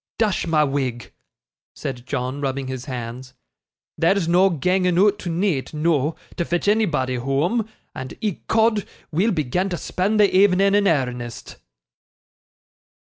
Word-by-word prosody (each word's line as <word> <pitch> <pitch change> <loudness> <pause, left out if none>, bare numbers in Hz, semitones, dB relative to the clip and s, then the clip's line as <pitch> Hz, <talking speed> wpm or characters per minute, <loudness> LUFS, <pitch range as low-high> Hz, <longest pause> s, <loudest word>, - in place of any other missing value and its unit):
Dash 210 -6 0
ma 155 -2 +3
wig!' 130 -4 -3 0.6
said 125 -2 -6
John, 130 0 -3
rubbing 135 -1 -2
his 130 -1 -5
hands, 125 0 -7 0.6
'there's 170 +1 +2
no 180 +3 +4
ganging 180 +2 +1
oot 205 +2 +4
to 180 - -5
neeght, 165 -5 -1
noo, 155 -1 +1 0.2
to 170 - +1
fetch 175 +3 -2
anybody 160 - +1
whoam, 160 - 0 0.2
and 130 0 -7
ecod, 220 +1 +1 0.2
we'll 185 +8 +2
begin 180 +3 0
to 175 - -2
spend 200 +6 -1
the 205 -3 +4
evening 195 0 +4
in 205 0 +3
airnest. 125 -6 -2
165 Hz, 135 wpm, -22 LUFS, 130-195 Hz, 0.6 s, no